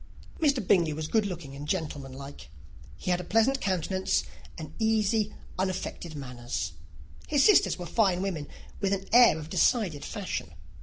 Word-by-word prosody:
Mr. 280 - +2
Bingley 170 -5 +4
was 155 +1 -4
good 215 +3 +2
looking 160 -7 -7
and 145 +1 -7
gentlemanlike: 140 -5 -5 0.5
he 180 - -2
had 180 0 +1
a - - -7
pleasant 225 +8 +2
countenance, 190 0 0 0.3
and 155 -4 -8
easy, 220 -1 +2 0.3
unaffected 185 -3 -3
manners. 120 - -4 0.6
His 285 -2 +3
sisters 420 - +5
were 175 - -6
fine 190 -2 +2
women, 165 -7 -3 0.3
with 200 -1 +1
an 195 0 -2
air 240 -8 +7
of 155 0 -8
decided 185 - +2
fashion. 135 - -5
180 Hz, 150 wpm, -28 LUFS, 150-210 Hz, 0.6 s, air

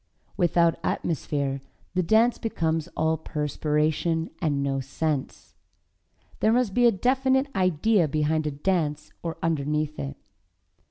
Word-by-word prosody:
Without 170 -1 +2
atmosphere 140 -4 -1 0.3
the 185 - +2
dance 220 +7 +3
becomes 165 -7 -1
all 160 +1 +2
perspiration 155 +2 -1
and 145 -4 0
no 135 -1 0
sense. 145 +1 -3 0.9
There 220 - +3
must 240 -4 +2
be 245 +2 +5
a - - +6
definite 265 +5 +2
idea 185 0 +3
behind 155 +1 0
a - - +1
dance 150 -1 -1
or 165 -1 -4
underneath 150 -1 -1
it. 140 0 -5
160 Hz, 120 wpm, -26 LUFS, 150-185 Hz, 0.9 s, a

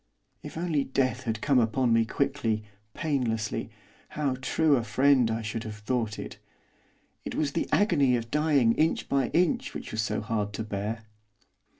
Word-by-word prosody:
If - - -9
only 165 -4 0
death 130 -1 -1
had 110 -1 -2
come 140 -3 +4
upon 120 +1 +2
me 115 0 +4
quickly, 120 -4 -1 0.3
painlessly, 125 -9 -1 0.4
how 145 -4 -1
true 155 +2 +3
a 120 - 0
friend 130 +2 +3
I 110 0 -2
should 110 +1 -4
have 110 -1 -6
thought 110 0 -2
it! - - -7 0.8
It - - -5
was 150 -2 0
the 165 - -2
agony 145 -11 +3
of 115 -1 -4
dying 145 -6 +3
inch 160 +5 +1
by 135 -3 +1
inch 175 -1 +1
which - - -6
was 110 - -1
so 110 - -1
hard 105 -1 -2
to 110 - -3
bear. 110 +2 -4
125 Hz, 170 wpm, -28 LUFS, 110-145 Hz, 0.8 s, come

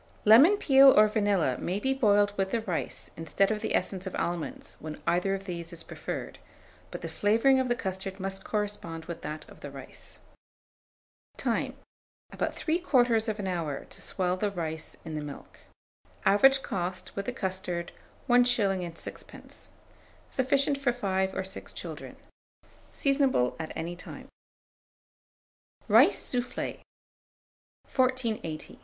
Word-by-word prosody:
Lemon 275 - +8
peel 275 -6 +7
or 215 - +7
vanilla 205 - +1
may 185 +3 -2
be 265 +5 +1
boiled 205 -5 +3
with 195 -1 0
the 230 +3 0
rice 185 -7 -4
instead 165 +5 +1
of 215 -1 -2
the - - -1
essence 190 -1 -1
of 190 - -5
almonds, 170 -2 -3
when 155 0 -7
either 180 +3 +2
of 195 - -6
these 170 -3 -5
is 170 -1 -9
preferred; - - -6 0.5
but - - -7
the - - -2
flavouring 230 +6 +3
of 260 - +1
the 240 - +1
custard 190 -1 -5
must 195 0 -3
correspond 205 -6 -3
with 170 - -7
that 155 +1 -6
of - - -15
the - - -7
rice. - - -11 1.2
Time. - - -1 0.6
About - - -2
3/4 240 - +1
hour 165 -6 -3
to - - -4
swell 180 -1 -1
the 205 +2 0
rice 160 -4 -5
in 160 - -6
the 155 - -3
milk. 145 -1 -9 0.7
Average 270 +8 +5
cost, 180 -1 -4
with 200 - -4
the - - 0
custard, 185 -6 -3 0.4
1s. 245 -1 +5
6d. 195 -7 -3 0.6
Sufficient 275 +1 +1
for 270 -3 +1
5 190 -5 -1
or 190 - -1
6 190 - -6
children. - - -7 0.8
Seasonable 270 - +2
at 160 -1 -4
any 170 +2 -4
time. 180 - -10 1.6
RICE - - +6
SOUFFLE. 250 0 -2
195 Hz, 135 wpm, -29 LUFS, 175-245 Hz, 1.6 s, Lemon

